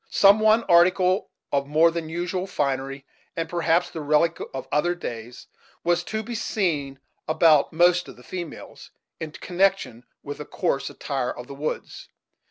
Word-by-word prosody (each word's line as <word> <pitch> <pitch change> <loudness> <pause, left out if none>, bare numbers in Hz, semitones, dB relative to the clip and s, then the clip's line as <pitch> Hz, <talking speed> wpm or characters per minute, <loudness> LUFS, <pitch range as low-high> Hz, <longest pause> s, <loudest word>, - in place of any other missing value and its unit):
Some 200 +1 +6
one 220 +1 +4
article 180 +2 +3 0.2
of 140 -1 0
more 160 +3 +4
than 165 -1 -4
usual 180 +3 -3
finery, 135 -4 -2 0.3
and 165 0 -2
perhaps 170 0 +1
the 160 - -6
relic 155 +3 +2
of 135 -1 -6
other 175 +4 +1
days, 120 -7 -7 0.4
was 175 0 +1
to 220 +3 -3
be 240 +2 -6
seen 155 -12 -1 0.3
about 155 -2 +4
most 175 +2 +3
of - - -11
the 125 - -17
females, 175 +3 -8 0.3
in 155 - -5
connection 185 -10 0 0.2
with 145 0 -7
the 150 - -6
coarse 140 -5 -1
attire 135 -3 -3
of 120 - -6
the 140 - -9
woods. 145 +3 -5
165 Hz, 160 wpm, -24 LUFS, 140-180 Hz, 0.4 s, Some